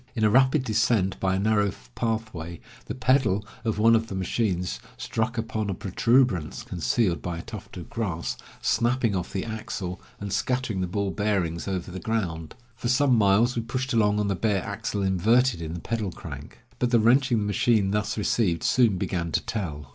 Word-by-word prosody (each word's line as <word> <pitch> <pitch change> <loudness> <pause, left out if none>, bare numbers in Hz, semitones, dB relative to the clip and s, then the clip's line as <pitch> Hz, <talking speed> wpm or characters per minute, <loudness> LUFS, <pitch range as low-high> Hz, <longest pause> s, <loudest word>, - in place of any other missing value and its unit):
In 110 - 0
a 105 - +4
rapid 130 +3 +4
descent 110 -4 +1
by 95 0 +1
a - - 0
narrow 105 -1 +2 0.2
pathway, 110 - -3 0.3
the - - -5
pedal 130 -6 +2 0.2
of 110 -3 -1
one 115 +2 +5
of 115 0 +1
the 95 - -5
machines 90 - -1 0.2
struck 115 +2 -2
upon 110 -2 -2
a 95 - -1
protuberance, 100 - +1
concealed 90 +1 0
by 85 -1 -4
a 85 - -6
tuft 105 -3 -9
of 85 - -7
grass, 95 -8 -3 0.3
snapping 120 -3 +2
off 90 -2 -3
the 95 - -3
axle, 105 -4 -5 0.2
and 100 -1 -4
scattering 120 -1 -1
the 90 - -1
ball 100 +2 -1
bearings 90 -3 -1
over 95 -2 -3
the 95 - -6
ground. 85 -7 -3 0.2
For 120 +1 -3
some 130 0 +4
miles 110 +3 +4
we 115 - 0
pushed 130 +3 -3
along 105 -2 +3
on 105 - +1
the 100 - +1
bare 100 -1 0
axle 105 -1 -3
inverted 105 +3 +3
in 80 +1 -4
the - - -5
pedal 110 -1 -2
crank. - - -9 0.2
But 125 - +1
the 120 -1 +4
wrenching 120 +2 +4
the 105 - 0
machine 105 0 +2
thus 105 +1 -1
received 100 -5 +1
soon 115 -7 +3
began 85 -2 -2
to - - +2
tell. 75 -10 -4
105 Hz, 190 wpm, -26 LUFS, 95-115 Hz, 0.3 s, one